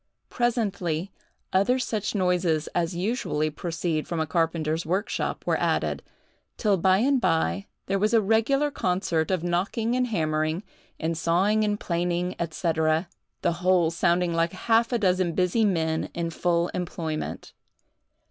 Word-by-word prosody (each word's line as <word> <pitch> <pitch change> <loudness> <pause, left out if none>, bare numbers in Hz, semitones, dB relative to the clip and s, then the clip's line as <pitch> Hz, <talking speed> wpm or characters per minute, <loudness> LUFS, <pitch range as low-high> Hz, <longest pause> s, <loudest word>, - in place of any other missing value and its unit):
Presently 200 -8 -1 0.4
other 200 +7 +3
such 220 -4 -2
noises 180 -4 +1
as 170 0 0
usually 175 -6 -1
proceed 165 0 -2
from 170 - -2
a 160 - +1
carpenter's 165 0 0
workshop 190 +6 -2
were - - +1
added, - - 0 0.6
till 210 -4 +2
by 185 +2 +4
and 260 +4 +2
by, 185 +2 +1 0.2
there 195 +1 0
was 210 +2 +2
a 230 - +5
regular 225 +8 +2
concert 180 - 0
of 185 -3 0
knocking 195 +7 0
and 250 0 +1
hammering, 155 -3 -1 0.4
and 165 +1 -1
sawing 185 +7 +2
and 210 0 0
planing, 175 +1 -1
&c. 165 +1 -1 0.7
the 170 - +2
whole 180 -2 +3
sounding 170 +1 +1
like 165 +1 +1
half 230 +4 +2
a 240 - +2
dozen 185 -4 +1
busy 185 +6 +2
men 160 -5 0
in 170 -1 -2
full 170 +1 +1
employment. 165 -3 -4
180 Hz, 140 wpm, -26 LUFS, 165-210 Hz, 0.7 s, a